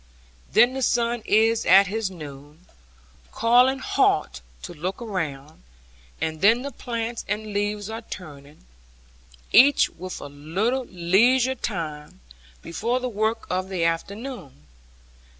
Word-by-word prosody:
Then 240 +3 +5
the 265 - -4
sun 235 -1 +1
is 225 +1 +3
at 195 +2 +6
his 210 +1 -2
noon, 150 -1 -11 0.7
calling 250 +3 +4
halt 160 - 0 0.2
to - - -7
look 175 +4 -4
around, 155 - -5 0.6
and 160 0 -3
then 225 +5 +4
the 280 - -5
plants 235 -1 -4
and 210 0 -4
leaves 205 0 -2
are 225 +1 -6
turning, 145 - -11 0.9
each 280 +2 +6
with 185 +2 -8
a - - -8
little 180 - -2
leisure 235 +10 +2
time, 155 - -5 0.4
before 230 +9 -2
the 255 0 -3
work 220 +1 -1
of 185 +1 -2
the 185 -3 -2
afternoon. 175 - -4
205 Hz, 125 wpm, -24 LUFS, 165-235 Hz, 0.9 s, at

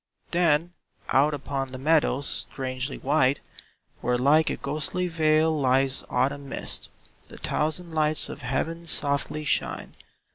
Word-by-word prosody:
Then 170 0 +2 0.4
out 145 +3 +3
upon 135 -1 -4
the 130 - -6
meadows, 145 -1 +2 0.3
strangely 130 0 -3
white, 140 -1 +2 0.6
Where 125 0 +1
like 150 +5 +4
a - - -1
ghostly 155 +5 -2
veil 160 -1 +3
lies 135 -1 +2
autumn 135 +2 0
mist. - - -4 0.4
The - - -12
thousand 160 +3 -1
lights 155 -1 +1
of - - -8
heaven 165 +7 -2
softly 145 0 -1
shine. - - -1
145 Hz, 130 wpm, -26 LUFS, 135-155 Hz, 0.6 s, like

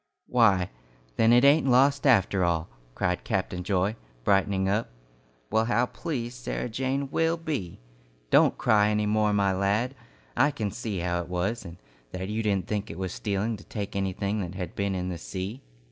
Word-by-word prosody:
"Why, 100 - +3 0.4
then 115 +1 +4
it 120 +3 +6
ain't 145 +1 +5
lost 140 +3 +4
after 100 -6 +4
all," 85 -1 0 0.3
cried 90 0 -1
Captain 95 -4 -2
Joy, 95 +2 0 0.3
brightening 95 +3 +2
up. 105 +4 0 0.6
"Well, 110 +1 +3
how 120 +1 +2
pleased 125 -3 -5
Sarah 125 - -3
Jane 135 +4 -2
will 165 +1 +1
be! 145 - -4 0.5
Don't - - +5
cry 105 -1 +3
any 105 0 +1
more, 105 0 +2
my 100 -2 +2
lad. 100 +7 0 0.4
I 145 - +4
can 110 -8 -3
see 100 -4 -4
how 90 0 -1
it 85 - -8
was, 100 +5 -2
and 85 -1 -9 0.4
that 95 +1 -4
you 110 +1 -1
didn't 100 -5 0
think 105 0 -3
it 80 - -7
was 95 -1 -3
stealing 105 +2 -2
to 100 - -14
take 100 -2 -6
anything 100 +2 -1
that 90 0 -5
had 90 -2 -5
been 100 -1 -1
in 90 0 -2
the 85 -2 -5
sea." 95 - -5
105 Hz, 180 wpm, -27 LUFS, 95-120 Hz, 0.6 s, it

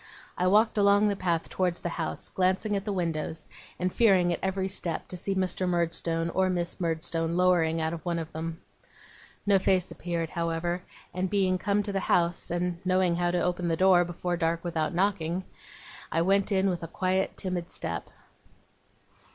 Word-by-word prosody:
I 180 - +1
walked 215 +3 +4
along 200 +1 +5
the 200 - 0
path 170 -4 -1
towards 180 -2 -1
the 175 - -2
house, 165 -1 -3
glancing 190 +3 +1
at 200 0 -2
the 210 - -1
windows, 165 -3 -2 0.3
and 180 +1 -1
fearing 185 -6 +4
at - - -3
every 190 0 -1
step 180 -4 -2
to - - -3
see 195 +2 -2
Mr. 185 -1 0
Murdstone 165 -1 0
or 190 +1 +2
Miss 175 -2 -2
Murdstone 165 0 -1
lowering 170 -3 +3
out 160 0 -1
of 165 -3 -6
one 170 -1 -1
of 165 -1 -5
them. 165 +1 -5 0.9
No 200 -1 +4
face 185 -1 +1
appeared, 170 -2 -3
however; 170 +1 -1 0.3
and 185 +1 -1
being 185 -2 +2
come 205 +1 +1
to 205 - -3
the 195 - 0
house, 175 -2 +1
and 175 0 -1
knowing 185 -2 +2
how 175 0 +1
to 175 0 0
open 180 0 -1
the 165 -1 +1
door, 185 -1 +5
before 175 +1 -3
dark, 165 0 0
without 165 -2 -1
knocking, 180 -2 0 0.7
I 165 - +2
went 195 +3 +2
in 195 0 +3
with 175 - -4
a 165 - -5
quiet, 185 +3 -1
timid 180 -2 -3
step. - - -4
180 Hz, 185 wpm, -28 LUFS, 170-190 Hz, 0.9 s, along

